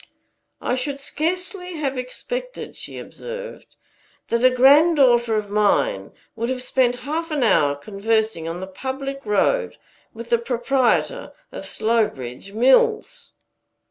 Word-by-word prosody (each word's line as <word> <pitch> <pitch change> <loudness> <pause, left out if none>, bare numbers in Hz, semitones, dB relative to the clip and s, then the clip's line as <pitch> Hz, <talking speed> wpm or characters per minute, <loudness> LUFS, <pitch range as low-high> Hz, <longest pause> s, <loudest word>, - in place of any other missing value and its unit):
"I - - -1
should 275 +2 -3
scarcely 360 +5 -3
have 280 -3 -2
expected," - - -6
she - - -7
observed, 485 +1 -9 0.5
"that 235 +1 0
a 255 - +8
granddaughter 260 -3 +5
of 210 -1 -2
mine 210 - +1 0.2
would 230 +1 -2
have 255 -1 -2
spent 250 -1 +1
half 325 +3 -2
an 300 -4 0
hour 145 -10 +3
conversing 210 +2 -1
on 170 +2 -5
the - - -4
public 270 +7 -5
road 460 - +1 0.3
with 230 +1 -10
the 235 - +4
proprietor 250 - 0 0.2
of - - -7
Slowbridge 200 - -1
Mills." 440 - +2
255 Hz, 125 wpm, -22 LUFS, 220-315 Hz, 0.5 s, a